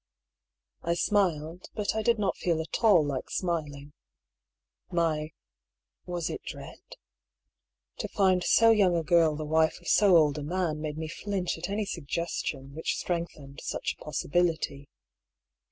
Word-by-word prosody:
I 170 0 0
smiled; 175 -4 0
but 210 -2 -1
I 220 - +1
did 235 +1 +2
not 200 -2 0
feel 170 -3 0
at 160 +8 -4
all 190 -9 +6
like 140 -3 -3
smiling. 150 -5 -3 1.0
My 160 -3 0 0.4
— - - -57
was 175 -2 -2
it - - -5
dread? - - -9 0.6
— 60 +1 -55
to - - -2
find 185 -2 +2
so 230 +4 +5
young 195 -5 +4
a 165 - 0
girl 160 -1 +4
the 155 +1 -4
wife 160 +1 +2
of 175 - -14
so 195 -3 +6
old 150 -2 +3
a - - -5
man 160 0 -2
made 155 -1 -4
me 160 0 -4
flinch 185 +2 -3
at 175 +3 -4
any 205 +1 -1
suggestion 150 -5 -4
which 160 +2 -2
strengthened 160 -5 -4
such - - -3
a - - -15
possibility. 155 -2 -1
170 Hz, 155 wpm, -28 LUFS, 150-185 Hz, 1.0 s, all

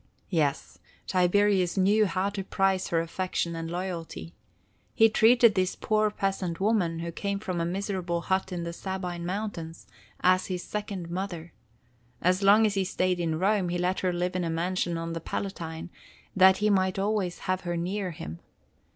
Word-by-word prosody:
"Yes, 150 -6 -1 0.3
Tiberius 185 0 +2
knew 205 +3 +4
how 185 +3 -1
to 195 -1 -4
prize 190 0 +1
her 165 -1 +1
affection 170 0 -2
and 165 0 -4
loyalty. 170 - -5 0.6
He 225 0 +6
treated 230 +1 +5
this 185 -1 0
poor 215 0 +1
peasant 195 -4 -2
woman, 190 -6 +1
who 170 0 -4
came 200 +4 -2
from 185 -4 -3
a - - 0
miserable 180 -2 -2
hut 190 +2 -1
in 175 -2 -3
the 170 0 -4
Sabine 180 -2 -4
mountains, 180 -4 -5 0.4
as 185 0 +3
his 180 -2 -3
second 200 -5 -5
mother. 175 -3 -5 0.7
As 185 +2 +2
long 205 +3 +6
as 210 - +1
he 195 -1 +1
stayed 185 -1 0
in 165 -2 0
Rome, 190 0 +1
he 175 - -1
let 180 +1 0
her 185 - 0
live 180 +1 -2
in 185 - 0
a 165 - -1
mansion 170 +1 -1
on 165 0 -4
the 165 - -4
Palatine, 165 -3 -5 0.4
that 190 0 +7
he 210 0 +2
might 190 -1 +2
always 195 -3 0
have 185 -1 -1
her 175 -1 -3
near 185 +3 -2
him. 85 - -7
185 Hz, 175 wpm, -28 LUFS, 170-195 Hz, 0.7 s, that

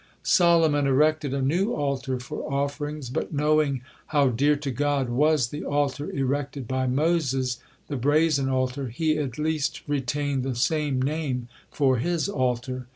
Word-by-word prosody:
Solomon 165 -5 +4
erected 150 +1 +2
a 135 0 -1
new 180 - +1
altar 135 -3 -2
for 125 - -6
offerings, 145 +1 -2
but - - -3
knowing 150 -3 +1 0.2
how 145 -3 +3
dear 140 +5 +2
to 145 -1 -4
God 140 0 0
was 140 0 +2
the 145 - -6
altar 145 0 -1
erected 140 -1 -2
by 130 0 -1
Moses, 135 -3 +1 0.3
the 145 - -3
brazen 145 +1 +2
altar, 130 +1 -1
he 155 +5 0
at 135 -5 -3
least 155 -1 -1
retained 145 0 -1
the 130 -1 -3
same 145 +1 0
name 135 -3 -2 0.2
for 135 -3 +2
his 170 +8 0
altar. 125 -5 -2
140 Hz, 150 wpm, -25 LUFS, 130-150 Hz, 0.3 s, Solomon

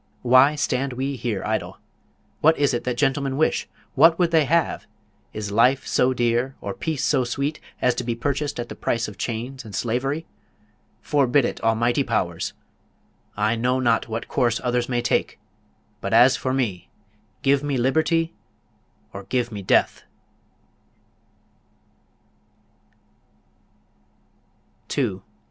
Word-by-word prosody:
Why 130 +4 +5
stand 135 -2 -1
we 135 +2 -3
here 115 -6 -3
idle? - - -2 0.6
What 160 +2 +4
is 145 -2 +2
it 120 - -2
that 125 -1 -2
gentlemen 135 0 0
wish? 155 - +1 0.2
What 165 +4 +5
would 175 -2 +2
they 160 -3 +4
have? 165 +3 0 0.4
Is 105 -1 -5
life 125 +5 +3
so 125 - +2
dear, 120 +1 0
or 100 - -5
peace 155 +3 -3
so 135 -4 +2
sweet, 140 +5 -2 0.2
as 125 - +4
to 125 - -4
be 120 -1 -2
purchased 145 +3 -2
at 120 - -3
the - - -7
price 115 0 -1
of 105 -1 -11
chains 125 +3 -4
and 105 -4 -9
slavery? 135 +9 -1 0.8
Forbid 140 -2 +2
it, - - -4
Almighty 115 +4 +2
Powers! 85 - -2 0.8
I 110 +2 +1
know 125 +3 0
not 120 -3 +1
what 115 +1 -4
course 120 -3 +1
others 125 -1 0
may 120 -1 0
take; - - 0 0.6
but - - -1
as - - +6
for 130 - -2
me, 115 -9 -2 0.5
give 135 0 +3
me 145 -2 -1
liberty 160 +6 +1 0.8
or 100 0 -8
give 120 0 -1
me 105 -2 -6
death! 95 - +2
125 Hz, 135 wpm, -23 LUFS, 115-140 Hz, 0.8 s, as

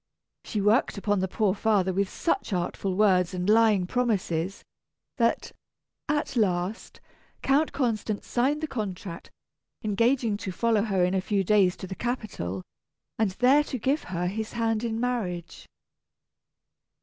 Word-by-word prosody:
She 210 - -2
worked 210 +3 +2
upon 205 0 0
the 190 - 0
poor 200 0 +1
father 200 -3 +1
with 195 +1 0
such 335 - -1
artful 185 +1 -2
words 185 -3 +3
and 180 +1 -2
lying 215 -3 +4
promises, 195 -6 -1 0.5
that, 230 -2 +1 0.6
at 295 -3 -1
last, 190 -1 -1 0.4
Count 290 +3 +3
Constant 225 -5 -1
signed 275 +5 0
the 315 - -1
contract, 195 - -5 0.5
engaging 230 +1 +1
to 195 -3 -5
follow 225 +2 +2
her 195 -4 +1
in 180 - 0
a 190 - +1
few 195 0 0
days 190 -2 +3
to - - -7
the 190 - -6
capital, 190 - -4 0.6
and 220 -2 +3
there 260 +7 +4
to 260 - -4
give 270 +6 0
her 180 -1 -3
his 215 +4 -3
hand 225 -1 0
in 225 -1 -2
marriage. 215 -9 -3
210 Hz, 145 wpm, -27 LUFS, 185-235 Hz, 0.6 s, lying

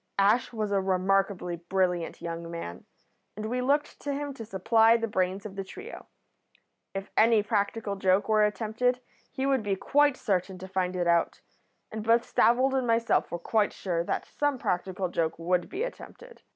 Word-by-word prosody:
Ash 205 +5 +3
was 215 -3 -3
a 200 -1 +2
remarkably 190 -1 0
brilliant 175 -1 -1
young 170 0 -5
man, 90 - -7 0.5
and 215 - -4
we 250 +3 -1
looked 285 +4 0
to 285 - -2
him 285 0 -4
to 235 - -8
supply 225 +3 +4
the 230 0 -2
brains 190 -1 -1
of 200 -2 -7
the 195 - -3
trio. 400 - -10 0.9
If 195 0 -5
any 225 -1 +5
practical 205 0 -1
joke 190 0 +2
were 215 -1 +4
attempted 225 +4 0 0.3
he 265 -1 -2
would 270 -2 +2
be 205 -2 -1
quite 290 +7 +2
certain 190 -2 -1
to 185 +1 -8
find 185 -1 -1
it 175 -1 0
out, 170 -1 +1 0.5
and 220 0 -5
both 230 +1 +4
Stavold 255 +3 +3
and 260 -2 0
myself 230 0 +2
were 175 - -2
quite 210 +4 +1
sure 170 -3 -2
that - - -2
some 290 -2 -1
practical 185 -3 -2
joke 165 -2 -1
would 175 +2 0
be 395 +5 -3
attempted. - - -9
205 Hz, 180 wpm, -28 LUFS, 185-235 Hz, 0.9 s, any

